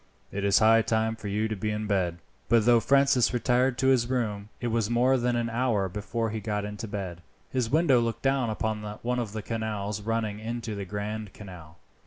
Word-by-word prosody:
It 100 - -3
is 100 0 +4
high 115 +1 +6
time 110 0 0
for 110 - -8
you 105 +2 0
to 110 - -3
be 105 +2 -2
in 105 0 -2
bed." 95 -5 0 0.3
But 115 -2 +4
though 120 -1 +6
Francis 135 -1 +3
retired 125 +1 +2
to 130 - +2
his 125 -3 +3
room, 105 -5 -2
it 120 - -2
was 115 -2 0
more 125 +3 +3
than 120 -1 +1
an 120 -1 0
hour 115 -4 0
before 110 +4 -3
he 110 - -3
got 105 -1 -2
into 105 +2 -6
bed. 95 -4 -5 0.3
His 125 -3 0
window 150 -3 +4
looked 115 -1 -2
down 135 -3 +2
upon 110 0 -2 0.2
one 125 +1 0
of 110 -4 -4
the 110 -1 -4
canals 105 -2 -3
running 110 -1 -2
into 115 0 -4
the 100 -1 -5
Grand 105 +1 -5
Canal. 90 -5 -11
110 Hz, 210 wpm, -27 LUFS, 105-120 Hz, 0.3 s, high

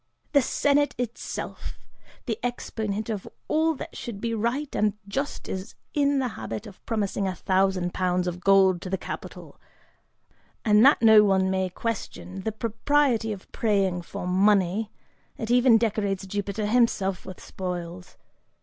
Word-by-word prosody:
The 285 - +5
Senate 290 +3 +2
itself, 240 -1 -5 0.5
the 225 -4 -2
exponent 220 -3 -3
of 215 -4 -4 0.2
all 320 +1 +2
that - - -8
should 225 -4 -6
be 230 +1 -2
right 240 +6 -1
and 210 -1 +2
just, 275 +8 -3
is 190 +3 -5 0.2
in 285 -1 +2
the 260 -2 0
habit 215 0 -6
of 205 -4 -13
promising 205 -3 -1
a 185 - -2
thousand 185 -1 +1
pounds 180 -1 0
of 180 0 -3
gold 190 -2 +4
to 185 - -6
the 190 - 0
capitol, - - -8 1.0
and 210 0 +6
that 275 -2 +6
no 220 -1 +8
one 190 -2 +2
may 190 -1 0
question 190 -2 -5
the 220 - -2
propriety 230 +2 +1
of 195 -2 -8
praying 195 -5 +1
for 175 - -7
money, 195 +2 +2 0.5
it 225 +1 -3
even 245 -1 +6
decorates 205 -3 -1
Jupiter 205 +2 -3
himself 210 -5 +1
with 185 - -9
spoils'. 180 -1 -6
210 Hz, 150 wpm, -26 LUFS, 190-230 Hz, 1.0 s, no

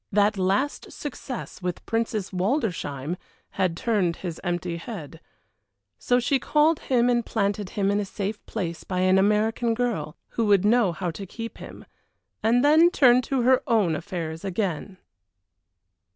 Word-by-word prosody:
That 205 +1 +3
last 195 +9 0
success 265 -6 -7
with 180 -1 -4
Princess 225 -3 -1
Waldersheim 180 - -1 0.3
had 185 -3 0
turned 195 -7 +1
his 175 -4 -6
empty 175 -1 -2
head. 170 - -8 0.8
So 245 0 +2
she 265 +3 +1
called 300 +4 +3
him 245 -2 +2
and 240 -1 +2
planted 205 -3 -1
him 200 -1 +2
in 205 - +1
a 205 - -1
safe 205 +2 -4
place 170 -6 -4
by 185 -1 -2
an 185 +1 +4
American 220 +3 +2
girl, 235 -9 -2
who 230 -2 -1
would 200 -1 +4
know 225 -3 +4
how 170 +1 -3
to 195 +4 -8
keep 230 +4 -7
him, - - -10 0.6
and 240 +4 +3
then 315 +4 +6
turned 255 -7 +5
to 260 -1 0
her 255 +1 +4
own 210 - +2
affairs 165 -1 -5
again. 190 -1 -3
205 Hz, 150 wpm, -25 LUFS, 180-240 Hz, 0.8 s, then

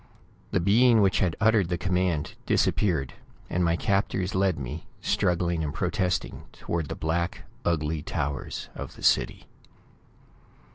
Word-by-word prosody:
The - - +1
being 110 +5 +5
which 95 - +3
had 90 -4 +1
uttered 110 -5 +3
the 90 - 0
command 90 -4 0
disappeared, 75 -11 +1 0.4
and 90 - +1
my 85 -1 +2
captors 95 0 0
led 95 -2 +2
me, 70 +4 -6
struggling 85 -2 +1
and 75 - -2
protesting, 90 +4 -1
toward 85 -3 -3
the - - -3
black, 85 +2 -2 0.2
ugly 80 -2 0
towers 70 0 -4
of - - -7
the - - -13
city. - - +2
85 Hz, 135 wpm, -27 LUFS, 80-95 Hz, 0.4 s, being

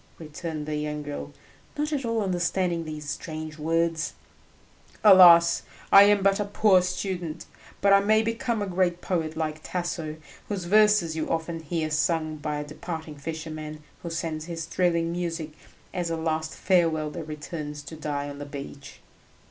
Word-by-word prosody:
returned 155 -1 -6
the 155 0 -3
young 150 0 -3
girl, 145 0 -6 0.5
not 300 +1 -1
at 275 -2 -1
all 230 -2 0
understanding 175 -2 0
these 155 -1 -7
strange 155 +2 -6
words. 165 +1 0 0.9
"Alas! 175 -4 +8 0.3
I 200 0 +10
am 205 -1 +4
but 195 0 +3
a 205 - 0
poor 200 -2 +4
student, 180 -3 -3 0.4
but 200 0 +5
I 200 - +8
may 215 +2 +3
become 230 -1 -1
a - - -1
great 180 -2 0
poet 160 -4 -2
like 155 -1 -2
Tasso, 170 -3 -3 0.3
whose 195 -4 -3
verses 210 -4 +4
you 160 - -2
often 165 0 -2
hear 160 0 -3
sung 155 0 0
by 150 0 -3
a 150 - -3
departing 160 0 -7
fisherman 155 0 -6 0.2
who 170 - -5
sends 165 -2 -3
his 165 -1 -5
thrilling 170 -2 +1
music 170 -2 -3 0.4
as 175 -2 -2
a 165 - -1
last 160 -1 -2
farewell 165 -5 +2
that 165 0 -6
returns 150 -1 -6
to 150 +3 -9
die 145 -2 -3
on 145 0 -8
the 145 - -5
beach." 140 -1 -9
165 Hz, 165 wpm, -26 LUFS, 155-180 Hz, 0.9 s, I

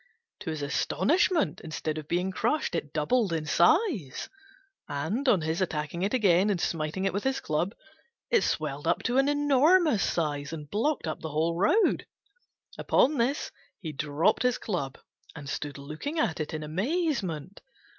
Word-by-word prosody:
To 175 - -5
his 155 -2 -3
astonishment, 285 - +1
instead 155 0 -3
of 150 - -10
being 180 +3 0
crushed 300 +8 0
it 150 -4 -3
doubled 190 +7 +1
in 160 -2 -1
size; 175 - +2 0.6
and, 195 - -1
on 195 -8 +4
his 160 +3 -1
attacking 160 -1 -2
it 200 +2 0
again 200 -5 +3
and 195 -4 0
smiting 165 +3 -2
it 195 - 0
with 200 - -2
his 265 0 0
club, 170 +7 -1 0.6
it 470 - +5
swelled - - -2
up - - +1
to 250 +2 +2
an 275 +1 +3
enormous 290 - +4
size 145 -3 -1
and 150 -2 -7
blocked 260 - 0
up 155 - -3
the 160 - -4
whole 160 +3 0
road. 310 - +2 0.7
Upon 290 -1 +3
this 260 +5 0 0.3
he 165 -5 -5
dropped 150 +7 +1
his 250 -1 +2
club, 140 - -3 0.4
and 145 -3 -8
stood 145 0 -4
looking 155 - -5
at 175 - 0
it 155 - -3
in 155 - -4
amazement. 195 - -2
175 Hz, 165 wpm, -28 LUFS, 155-255 Hz, 0.7 s, it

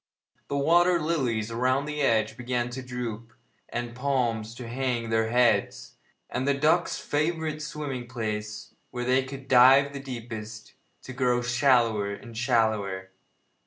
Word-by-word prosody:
The 140 - -2
water 175 +4 +4
lilies 125 -9 -1
around 130 +4 +1
the 150 0 -3
edge 110 -5 +2
began 120 -1 -2
to 130 +2 -5
droop, 120 -3 -6 0.4
and 120 0 -3
the - - -13
palms 120 -4 -1
to 120 -1 -8
hang 120 -2 -2
their 110 0 +1
heads, 120 -4 +1 0.3
and 130 +2 -3
the 140 - +3
ducks' 160 +5 +2
favourite 155 0 -2
swimming 145 -5 -5
place, 105 -3 -5 0.2
where 125 0 -4
they 130 +1 +3
could 135 0 -9
dive 135 +3 +6
the 140 - -5
deepest, 110 -5 -8 0.3
to 130 - -8
grow 125 -1 +1
shallower 120 -5 +2
and 115 +2 -12
shallower. 110 -6 0
125 Hz, 145 wpm, -27 LUFS, 115-135 Hz, 0.4 s, dive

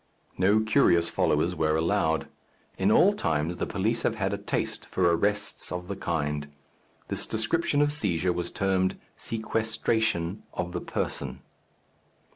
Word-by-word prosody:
No 100 +4 +4
curious 110 -7 +3
followers - - +1
were 80 0 +1
allowed. 80 -2 +1 0.5
In - - +2
all - - +6
times 80 +2 -1
the - - -1
police 110 +4 0
have 115 - 0
had 100 -2 -1
a - - -1
taste 100 - -2
for 95 - -1
arrests 100 +4 -1
of 90 0 -4
the 100 - -3
kind. 75 -5 -2 0.6
This - - -1
description 145 +7 +1
of 145 0 +1
seizure 90 - 0
was 90 0 -3
termed 95 -1 0 0.2
sequestration 110 -4 -1
of 90 0 -2
the 90 - -3
person. - - -4
95 Hz, 140 wpm, -27 LUFS, 85-110 Hz, 0.6 s, all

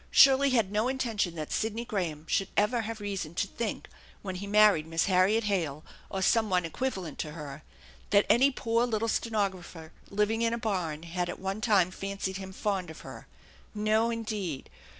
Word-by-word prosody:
Shirley 275 +1 +6
had 225 -7 +2
no 215 +3 +1
intention 230 -9 -1
that 155 -2 -5
Sidney 225 +2 -1
Graham 165 -8 -3
should 195 - +1
ever 230 +3 +3
have 225 0 -5
reason 195 -6 -4
to - - +1
think, 220 +2 -4 0.4
when 190 -2 -4
he 200 +2 -6
married 205 -6 +5
Miss 165 0 +1
Harriet 195 +4 +3
Hale 165 -8 -1 0.2
or 190 -1 -2
some 220 +2 +3
one 180 -2 +2
equivalent 185 - -4
to 150 - -4
her, 150 -2 -8 0.5
that 200 0 +4
any 265 +4 +5
poor 235 -2 0
little 225 -1 -1
stenographer 190 -8 -2 0.2
living 210 +3 +1
in 230 0 +2
a - - -4
barn 180 -9 -2
had 175 +1 -3
at - - -5
one 195 +3 -3
time 200 -6 +3
fancied 195 0 -4
him 190 -1 -7
fond 190 -3 -2
of 160 - -10
her. - - -10 0.5
No, 215 +2 +2
indeed 215 - -4
200 Hz, 180 wpm, -29 LUFS, 180-225 Hz, 0.5 s, Shirley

